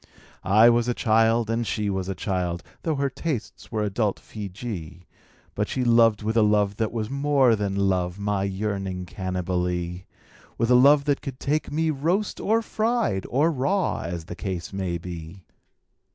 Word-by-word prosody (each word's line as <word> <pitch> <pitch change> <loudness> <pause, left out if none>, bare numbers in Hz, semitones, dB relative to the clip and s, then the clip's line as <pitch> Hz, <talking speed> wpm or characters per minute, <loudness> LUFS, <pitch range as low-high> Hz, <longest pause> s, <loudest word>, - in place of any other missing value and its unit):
I 110 +4 +6
was 120 0 +2
a 120 - 0
child, 115 0 +3
and 115 +1 0
she 105 -1 -1
was 95 -1 -2
a 95 - -2
child 90 -1 -2
— - - -33
Tho' 160 -2 -1
her 140 0 0
tastes 135 -2 -5
were 110 -2 -1
adult 105 0 0
Feejee 95 -5 -7 0.3
— - - -32
But 105 0 -1
she 130 - -1
loved 115 -3 +4
with 110 +1 -1
a 115 - +5
love 105 -1 +2
that 110 -1 -1
was 110 -1 -3
more 140 -4 +3
than 100 -2 -2
love, 90 -1 0
My 100 -1 -1
yearning 95 -2 -3
Cannibalee; 90 -1 -3 0.5
With 115 +1 +1
a - - +7
love 140 +3 +6
that 145 -1 +1
could 130 -2 -7
take 150 +2 -1
me 160 +2 +1
roast 170 +9 -1
or 225 +2 +1
fried 220 - 0
Or 150 +6 +2
raw, 175 +8 0
as 85 -1 -5
the - - -7
case 90 -3 -5
might 90 -3 -3
be. 85 +1 -8
105 Hz, 180 wpm, -25 LUFS, 95-130 Hz, 0.5 s, a